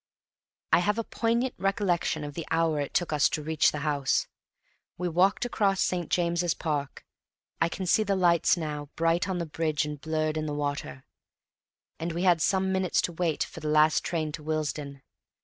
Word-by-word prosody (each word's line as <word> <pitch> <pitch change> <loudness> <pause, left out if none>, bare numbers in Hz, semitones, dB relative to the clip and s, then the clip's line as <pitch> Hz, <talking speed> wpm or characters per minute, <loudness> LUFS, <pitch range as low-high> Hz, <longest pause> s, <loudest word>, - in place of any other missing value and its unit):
I - - +7
have 210 +4 +1
a 230 - 0
poignant 235 +3 0
recollection 190 -5 0
of 145 0 -6
the 165 +2 -6
hour 160 -2 +1
it 145 - -4
took 175 -3 +1
us 150 - +4
to 155 - -3
reach 155 0 +3
the 150 - -5
house. 145 -3 +1 0.7
We 180 - -2
walked 180 +7 +2
across 200 -5 +1
St. 175 -2 0
James's 170 -1 +1
Park 145 -4 -3 0.6
(I 165 - +3
can 185 +3 -4
see 200 - +3
the 200 -2 +1
lights 175 -2 +3
now, 150 -3 -4
bright 165 +3 +1
on 185 - -1
the 170 - -2
bridge 155 -1 -1
and 150 -1 -6
blurred 155 0 -1
in 155 0 -2
the 145 - -3
water), 145 -2 -4 1.0
and 165 +1 -3
we 170 +2 -2
had 175 -3 +4
some 190 +2 +1
minutes 190 -2 +1
to - - -1
wait 165 -2 0
for - - -9
the 155 - -5
last 155 +1 +4
train 160 -3 -2
to 155 - -7
Willesden. 150 -3 -3
165 Hz, 190 wpm, -28 LUFS, 150-180 Hz, 1.0 s, I